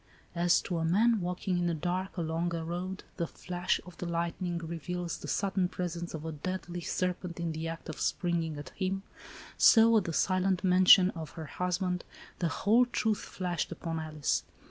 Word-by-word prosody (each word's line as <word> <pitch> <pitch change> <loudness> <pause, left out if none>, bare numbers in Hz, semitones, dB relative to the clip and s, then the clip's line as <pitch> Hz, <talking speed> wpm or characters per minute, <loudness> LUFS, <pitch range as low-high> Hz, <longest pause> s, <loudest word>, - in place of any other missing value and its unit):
— - - -31
As, 175 - +4
to 175 -3 -2
a - - -1
man, 210 +6 +3
walking 180 +1 -1
in 175 - +1
the 170 - 0
dark, 180 +5 -2
along 170 +1 -1
a 165 -1 -3
road, 180 +3 -4
the 170 -2 -1
flash 180 +2 -2
of 180 - -12
the 175 - -3
lightning 170 +1 -2
reveals 170 +1 -4
the - - -8
sudden 195 -2 +1
presence 175 -2 -4
of 155 0 -6
a 160 - -3
deadly 175 +3 -4
serpent 180 0 -2
in 170 -1 -1
the 160 +1 -4
act 165 0 -6
of 155 - -6
springing 165 -3 0
at 145 - -7
him, 195 0 -2 0.6
so, 230 0 +7
at 205 - +1
the 170 - -2
silent 185 +1 +1
mention 185 +1 +7
of 160 -3 -7
her 160 -2 -6
husband, 180 +2 -1 0.4
the 175 - +1
whole 230 +8 +3
truth 220 -3 0
flashed 175 -3 -3
upon 165 -1 -4
Alice. 155 -2 -1
175 Hz, 190 wpm, -31 LUFS, 165-185 Hz, 0.6 s, so